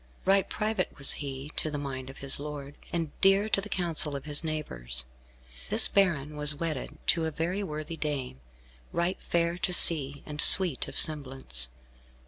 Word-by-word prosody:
Right 195 +1 +3
private 215 -4 -2
was 140 - +3
he 140 0 -5
to 155 - -1
the 150 - -4
mind 135 -2 -6
of 135 - -11
his 135 0 -2
lord, 145 -1 -7 0.2
and 165 -3 -3
dear 195 +2 +4
to 195 - +1
the 205 - -8
counsel 165 -6 0
of 140 - -7
his 150 +1 +1
neighbours. 65 - -4 0.7
This - - +7
baron 155 -7 +1
was 150 0 0
wedded 150 -2 -5
to 165 -2 +3
a - - -1
very 170 +5 -3
worthy 155 -3 -6
dame, 135 - -4 0.5
right 170 +2 -1
fair 170 +1 -1
to 180 - -2
see, 145 -5 +4
and 150 -1 -3
sweet 180 -8 +6
of - - -7
semblance. 130 - 0
150 Hz, 170 wpm, -28 LUFS, 140-170 Hz, 0.7 s, This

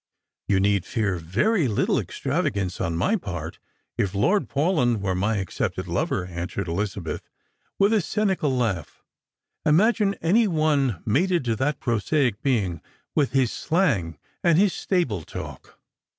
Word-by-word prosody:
" - - -64
You 100 -2 +3
need 100 -1 +2
fear 105 -5 -1
very 135 - +1
little 105 - +1
extravagance 95 -3 -2
on 85 -3 -1
my 210 - +2
part 85 - -6 0.4
if 100 0 0
Lord 190 - +2
Paulyn 140 - +1
were 95 -1 -1
my 100 +4 0
accepted 95 -3 -3
lover," 90 - -1
answered 90 +2 -4
Elizabeth, 95 0 -3 0.5
with 200 +2 +4
a 215 - +3
cynical 190 -4 0
laugh. 110 - -2 0.3
" - - -59
Imagine 200 +5 +3
any 210 +8 +3
one 150 - +1
mated 170 - +1
to 115 -2 +1
that 140 +3 0
prosaic 120 0 0
being, 100 - 0 0.3
with 140 -4 +1
his 130 -4 +2
slang 120 - 0 0.3
and 170 -2 +4
his 195 0 +4
stable 150 - 0
talk - - -9
120 Hz, 145 wpm, -24 LUFS, -, 0.5 s, with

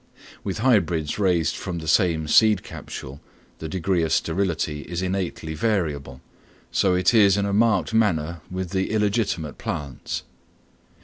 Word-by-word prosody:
With 95 - -3
hybrids 95 - +1
raised 90 -6 +2
from 90 -2 -5
the 80 -1 -6
same 80 -2 +2
seed 110 +7 +5
capsule 70 +3 -8 0.4
the 80 - -5
degree 90 +1 0
of 80 - -1
sterility 80 -4 0
is 85 +3 -4
innately 90 -4 -3
variable, 75 - -2 0.5
so 95 -2 +2
it 90 +5 +3
is 100 -3 +5
in 100 - +1
a 100 - -1
marked 105 -5 +2
manner 85 -7 +1
with 95 0 -5
illegitimate 100 - 0
plants. 70 -4 -4
90 Hz, 135 wpm, -24 LUFS, 80-100 Hz, 0.5 s, seed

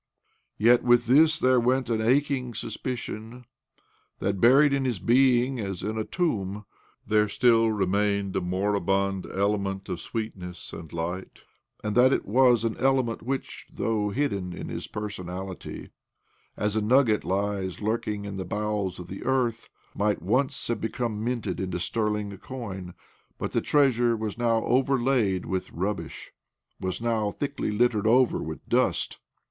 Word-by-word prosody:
Yet 120 +3 +5
with 120 0 +4
this 155 +6 +5
there 130 -2 +4
went 130 +2 +1
an 115 -1 0
aching 130 0 +1
suspicion 115 0 -5 0.7
that, 100 0 -2
buried 140 +4 +6
in 140 -1 +1
his 125 -5 -1
being, 125 +4 +3
as 95 -4 -4
in 110 +1 -2
a 110 - -1
tomb, 105 - -2 0.4
there 105 0 +3
still 115 0 +4
remained 100 -1 0
a - - +1
moribund 95 +1 0
element 100 -1 -1
of 90 -2 -3
sweetness 95 -6 -6
and 80 -2 -9
light, 85 +3 -5 0.4
and 105 -1 -1
that 125 +2 +6
it - - 0
was 125 +1 +4
an 115 -1 -1
element 130 -3 +1
which, 130 +3 -4
though 105 -1 -1
hidden 100 -7 -1
in - - -7
his - - -5
personality, 95 -3 -6 0.7
as 105 0 -1
a 110 - +2
nugget 115 0 +3
lies 95 -1 -2
lurking 105 -1 -2
in 100 -1 -5
the 95 - -3
bowels 105 -1 -2
of 90 - -8
the 95 +2 -8
earth, 120 -3 0 0.2
might 105 0 0
once 130 - 0
have 120 - -2
become 110 -1 -2
minted 115 -6 -2
into 90 -2 -2
sterling 105 0 -1
coin. 100 -8 -7 0.4
But - - -4
the - - +1
treasure 120 -5 +3
was 110 -2 -3
now 115 -1 +1
overlaid 125 -7 +2
with 95 -1 -3
rubbish— 95 +4 -4 0.5
was 95 +3 -3
now 110 -3 +1
thickly 140 +5 -3
littered 110 0 +2
over 125 +2 +4
with - - -7
dust. - - +1
110 Hz, 150 wpm, -26 LUFS, 100-125 Hz, 0.7 s, buried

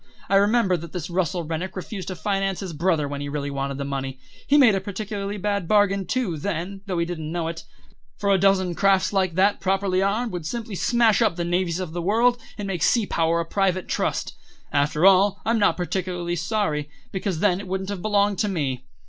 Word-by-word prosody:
I 195 - +3
remember 200 -2 +3
that 165 -1 -9
this 175 -1 -5
Russell 175 -1 0
Rennick 165 +4 -4
refused 185 0 -6
to 185 - -4
finance 195 +2 -1
his 185 -4 -5
brother 160 -2 +1
when 140 0 -5
he 145 - -4
really 145 -1 -3
wanted 140 0 -3
the 140 - -3
money. 135 -1 -4 0.3
He 290 - +5
made 250 -7 +7
a 195 - 0
particularly 205 0 -4
bad 200 -2 -1
bargain, 200 -2 +3
too, 235 -11 -1
then, 195 +3 -4
though 185 -2 -2
he 170 - +1
didn't 160 -3 -5
know 170 -1 -2
it; 165 0 -7 0.5
for 200 -1 +1
a 195 - +4
dozen 190 -2 +3
crafts 195 +2 +2
like 185 -4 +1
that, 200 +3 +3
properly 190 -1 +1
armed, 215 +4 0
would 175 -4 -4
simply 230 +1 -5
smash 235 +3 +3
up 215 -6 +3
the 170 -1 -2
navies 175 0 0
of 180 -4 -5
the 175 - -3
world, 230 +6 +2 0.2
and 205 -2 -4
make 180 -4 -3
sea 230 +5 +3
power 165 -2 +1
a - - -4
private 185 0 0
trust. - - -1 0.4
After 150 +4 +2
all, 195 +1 +5
I'm 230 0 +2
not 205 - +3
particularly 180 -1 -2
sorry, 175 -5 -1 0.2
because 190 -3 -2
then 185 -1 +2
it 200 - -8
wouldn't 190 +1 -3
have 195 -3 -5
belonged 205 -1 +1
to 210 - +2
me. 135 -8 -2
185 Hz, 215 wpm, -24 LUFS, 170-200 Hz, 0.5 s, made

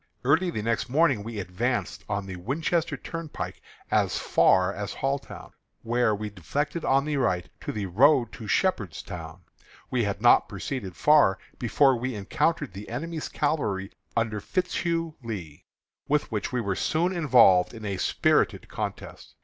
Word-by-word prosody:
Early 160 +7 +3
the 110 -11 -3
next 115 +2 -1
morning 135 -5 +3
we 115 0 -6
advanced 105 +7 -2
on 100 -1 -2
the 95 -1 -6
Winchester 150 - -1
Turnpike 165 +2 -6 0.3
as - - +2
far 95 +1 +3
as 100 0 -5
Halltown, 135 +1 -4 0.3
where 120 -2 +2
we 105 0 -5
deflected 145 - -3
to - - -6
the 140 +2 +2
right 90 -9 0 0.2
on - - -3
the 105 -2 -2
road 125 - +4
to 110 - -9
Shepherdstown. 90 - -2 0.5
We 125 -2 +1
had 100 -1 -2
not 120 +2 +5
proceeded 100 -2 -5
far 150 -11 +5 0.2
before 130 +3 +4
we 125 +1 -3
encountered 125 - -1
the 100 +2 -8
enemy's 160 +6 -4
cavalry 110 -11 -1 0.3
under 110 -2 0
Fitzhugh 170 - -1
Lee, 95 -11 -7 0.4
with 150 -2 0
which 105 -2 -2
we 125 -1 0
were 100 -3 -1
soon 170 - 0
involved 120 - +5
in 110 -2 -9
a 100 -2 -2
spirited - - +1
contest. - - -6
115 Hz, 150 wpm, -26 LUFS, 100-145 Hz, 0.5 s, not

